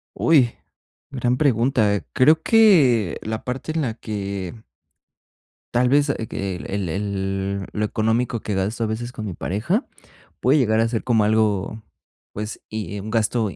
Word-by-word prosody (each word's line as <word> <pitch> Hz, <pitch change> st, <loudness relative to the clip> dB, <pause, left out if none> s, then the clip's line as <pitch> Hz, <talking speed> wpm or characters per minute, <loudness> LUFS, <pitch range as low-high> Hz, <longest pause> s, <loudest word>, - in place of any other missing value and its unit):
Uy, 135 Hz, -8 st, +4 dB, 0.6 s
gran 125 Hz, -1 st, 0 dB
pregunta. 115 Hz, -6 st, +2 dB
Creo 155 Hz, +5 st, +5 dB
que 150 Hz, -, +4 dB
la 110 Hz, 0 st, -4 dB
parte 130 Hz, +5 st, -4 dB
en 160 Hz, 0 st, -1 dB
la 120 Hz, -5 st, -1 dB
que 100 Hz, -1 st, -5 dB, 1.1 s
tal 125 Hz, +1 st, +3 dB
vez, 145 Hz, +2 st, +3 dB
ah, -, -, +1 dB
que 95 Hz, -2 st, -3 dB
el 95 Hz, -1 st, -4 dB
el 95 Hz, 0 st, -2 dB
lo 105 Hz, 0 st, -1 dB
económico 110 Hz, +2 st, 0 dB
que 105 Hz, -, -3 dB
gasto 105 Hz, +5 st, -1 dB
a -, -, 0 dB
veces 120 Hz, +3 st, -4 dB
con 110 Hz, -, -6 dB
mi 95 Hz, -, -4 dB
pareja, 130 Hz, -, -1 dB, 0.5 s
puede 135 Hz, +4 st, +3 dB
llegar 110 Hz, -5 st, +2 dB
a 115 Hz, -, +3 dB
ser 115 Hz, -1 st, -2 dB
como 115 Hz, -4 st, +2 dB
algo, 110 Hz, 0 st, 0 dB, 0.5 s
pues, 105 Hz, +1 st, -6 dB
y 110 Hz, -2 st, -5 dB
y -, -, -4 dB
un 110 Hz, -, -7 dB
gasto 110 Hz, -1 st, +1 dB
110 Hz, 160 wpm, -22 LUFS, 100-125 Hz, 1.1 s, Creo